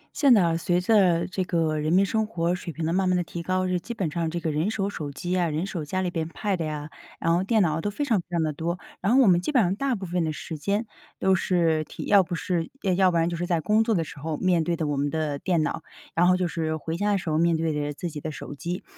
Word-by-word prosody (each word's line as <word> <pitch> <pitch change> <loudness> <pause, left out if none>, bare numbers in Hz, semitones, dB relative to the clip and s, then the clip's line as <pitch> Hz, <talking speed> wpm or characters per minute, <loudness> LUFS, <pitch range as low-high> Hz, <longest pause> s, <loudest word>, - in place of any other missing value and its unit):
现 280 -3 +4
在 210 -6 +7
啊， 165 -1 +2
随 175 +1 +1
着 180 -4 +3
这 185 0 -2
个 165 -4 0
人 155 +1 -1
民 190 +3 +5
生 220 +2 0
活 175 -5 0
水 175 -1 -5
平 160 +1 -4
的 165 - 0
慢 185 0 +2
慢 180 - +3
地 175 - 0
提 170 0 -6
高， 185 +2 0
这 180 -1 0
基 235 +7 -7
本 180 -8 -2
上 165 0 -1
这 170 +2 -3
个 165 -2 -2
人 155 +6 0
手 200 -3 -1
手 155 -7 -5
机 175 +6 -5
呀， 180 -2 +1
人 155 +4 -1
手 185 -5 -4
家 185 +5 -2
里 180 - -1
边 165 -2 -3
Pad 190 0 -2
呀， 150 -1 -5 0.3
然 165 - +2
后 180 - +1
电 220 0 +3
脑 160 -2 0
都 205 - -1
非 285 +8 -2
常 225 -8 +2
非 - - -32
常 170 -2 0
得 155 -1 -1
多。 170 +4 -2 0.2
然 195 +5 +1
后 270 - +6
我 225 - +4
们 175 -1 +5
基 180 - -2
本 255 -6 +4
上 185 +1 +1
大 270 +3 0
部 195 -3 -6
分 175 0 -1
的 160 - -1
时 160 +1 -6
间 200 +9 0 0.3
都 190 - +2
是 170 -4 +2
体 - - -8
要 200 -1 +5
不 180 -1 -3
是， 165 -1 -2
呃 190 -3 +2
要 190 0 +4
不 170 - 0
然 165 0 +2
就 175 - -2
是 175 +1 -3
在 170 -2 +1
工 210 +7 +3
作 225 -1 +1
的 165 - +1
时 155 -2 -10
候 155 +1 -3
面 180 -3 +2
对 170 +2 0
的 160 -1 -2
我 145 -1 -1
们 145 +1 0
的 150 -2 -2
电 175 -4 +1
脑， 155 - -2 0.3
然 175 +2 +3
后 185 0 +4
就 180 -1 0
是 160 -1 -2
回 160 +2 -4
家 205 +4 0
的 200 - +3
时 175 -4 -3
候 155 - +1
面 170 0 +3
对 160 -1 0
着 145 0 -2
自 175 - -5
己 150 - -7
的 155 - -4
手 145 - -8
机。 175 +5 -5
175 Hz, 335 characters per minute, -25 LUFS, 160-190 Hz, 0.3 s, 在